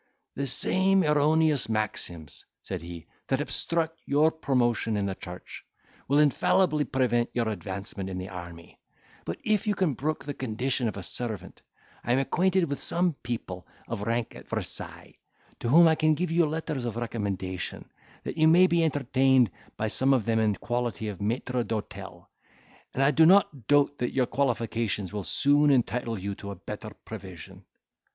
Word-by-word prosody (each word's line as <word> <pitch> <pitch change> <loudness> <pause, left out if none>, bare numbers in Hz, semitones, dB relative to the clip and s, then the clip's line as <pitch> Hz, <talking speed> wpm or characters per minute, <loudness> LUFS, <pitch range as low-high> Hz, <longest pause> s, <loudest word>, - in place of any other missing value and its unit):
"The 140 - -3
same 190 +8 +2
erroneous 150 -2 +3
maxims," 85 -9 -3 0.2
said - - -4
he, 85 -1 -9 0.2
"that - - +1
obstruct 165 -1 -2
your 150 +3 +4
promotion 120 -7 0
in 100 - 0
the 95 - -1
church, 90 -1 -10 0.4
will 140 - +3
infallibly 150 +2 +3
prevent 120 -3 +1
your 120 -2 0
advancement 100 -1 -5
in 95 - -5
the 95 +1 -5
army; 85 -2 -10 0.5
but, 85 - -4
if 215 0 +1
you 205 - +2
can 180 -6 +1
brook 150 +5 -3
the 145 - -3
condition 125 0 -2
of 105 - -4
a 95 - -6
servant, 110 +1 -4 0.4
I 120 - +1
am - - +3
acquainted 185 +7 +2
with 140 -4 -2
some 175 0 +2
people 105 -7 -5 0.2
of 115 -3 -4
rank 115 +2 -1
at - - -12
Versailles, - - -5 0.4
to 115 - -2
whom 165 +6 +7
I 160 - +5
can 155 0 +2
give 175 +1 -2
you 170 -1 +3
letters 155 -3 -3
of 120 -3 -3
recommendation, 100 -6 -4 0.4
that - - -5
you 155 - +6
may 175 +3 +7
be 170 -2 +2
entertained 130 - +3 0.3
by 110 - -1
some 130 +5 +1
one 135 - +6
of 110 - -8
them 115 -1 +2
in 110 -2 +2
quality 120 +1 -2
of 100 -2 -7
maitre 120 +3 -1
d'hotel; 110 -2 -6 0.7
and 135 - +2
I 140 - +5
do 160 +1 +6
not 165 - +4
doubt 145 0 +3
that 125 - -1
your 130 -2 +2
qualifications 115 -7 -1
will 105 -2 -3
soon 145 +8 +3
entitle 120 -3 +1
you 100 +1 -4
to 100 - -8
a 100 - -5
better 90 - -7 0.2
provision." - - -10
125 Hz, 175 wpm, -27 LUFS, 105-150 Hz, 0.7 s, whom